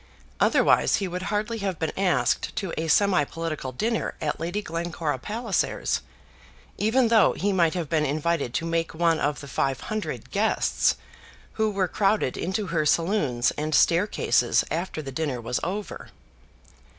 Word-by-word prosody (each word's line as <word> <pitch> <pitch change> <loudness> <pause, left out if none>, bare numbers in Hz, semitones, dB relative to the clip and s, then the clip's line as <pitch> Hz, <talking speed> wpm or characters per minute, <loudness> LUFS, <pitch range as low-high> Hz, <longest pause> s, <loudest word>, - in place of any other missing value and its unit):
Otherwise - - +4
he 195 - -1
would 180 0 -4
hardly 215 +2 -1
have 195 -4 -2
been 160 -1 -2
asked 155 -11 +1
to 195 -6 -3
a 160 - -2
semi 185 +1 +4
political 155 -3 -4
dinner 225 - -2
at 150 -2 -2
Lady 175 +5 -2
Glencora 165 -5 -3
Palliser's, 215 - -1 0.8
even 230 +3 +3
though 225 -2 +5
he 200 0 -1
might 170 -2 +2
have 170 -4 -2
been 155 +1 +1
invited 155 -1 0
to 165 - -2
make 165 0 -1
one 165 -1 +2
of 145 +1 -1
the 140 - -9
five 135 0 -1
hundred 215 -1 -4
guests - - +2 0.6
who 220 -1 +1
were 195 -3 0
crowded 195 -7 +1
into 190 +4 -2
her 165 -3 0
saloons 150 - +1
and 155 0 0
staircases 180 +5 +3
after 165 -1 -3
the 135 - -6
dinner 140 -3 -2
was 120 +1 -2
over. 200 +4 -5
170 Hz, 155 wpm, -25 LUFS, 150-200 Hz, 0.8 s, though